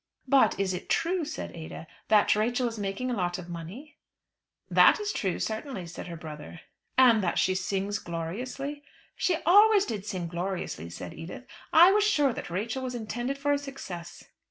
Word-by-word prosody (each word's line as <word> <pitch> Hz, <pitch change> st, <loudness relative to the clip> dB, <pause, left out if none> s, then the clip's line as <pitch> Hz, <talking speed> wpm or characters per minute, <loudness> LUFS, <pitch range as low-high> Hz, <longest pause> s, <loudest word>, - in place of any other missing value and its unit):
"But 265 Hz, -6 st, +4 dB
is 190 Hz, -1 st, 0 dB
it 180 Hz, -, -6 dB
true," 350 Hz, +1 st, +1 dB
said 310 Hz, +2 st, -6 dB
Ada, 160 Hz, 0 st, -8 dB, 0.2 s
"that 210 Hz, -1 st, +5 dB
Rachel 240 Hz, +4 st, +1 dB
is 225 Hz, -2 st, -5 dB
making 205 Hz, +6 st, -2 dB
a -, -, 0 dB
lot 175 Hz, -3 st, -1 dB
of 180 Hz, -1 st, -9 dB
money?" 185 Hz, -, -9 dB, 0.7 s
"That -, -, +6 dB
is 415 Hz, -1 st, -2 dB
true, 190 Hz, -4 st, -1 dB
certainly," 220 Hz, -3 st, -4 dB
said 170 Hz, +2 st, -8 dB
her 170 Hz, -, -6 dB
brother. 155 Hz, +1 st, -9 dB, 0.4 s
"And 240 Hz, -5 st, +6 dB
that 175 Hz, -, 0 dB
she 185 Hz, -, +3 dB
sings 195 Hz, +2 st, -2 dB
gloriously?" 245 Hz, -, -5 dB, 0.3 s
"She 360 Hz, -, +1 dB
always 410 Hz, +3 st, +6 dB
did 210 Hz, -3 st, -5 dB
sing 185 Hz, -4 st, -3 dB
gloriously," 175 Hz, -, -4 dB
said 85 Hz, +1 st, -8 dB
Edith. 170 Hz, +10 st, -9 dB, 0.3 s
"I 345 Hz, +4 st, +8 dB
was 415 Hz, +1 st, +3 dB
sure 295 Hz, -, +3 dB
that -, -, -6 dB
Rachel 220 Hz, +9 st, -3 dB
was 255 Hz, -1 st, -4 dB
intended 240 Hz, +4 st, -3 dB
for 290 Hz, +1 st, +1 dB
a 285 Hz, -, +1 dB
success." 190 Hz, -12 st, -8 dB
215 Hz, 180 wpm, -28 LUFS, 175-275 Hz, 0.7 s, I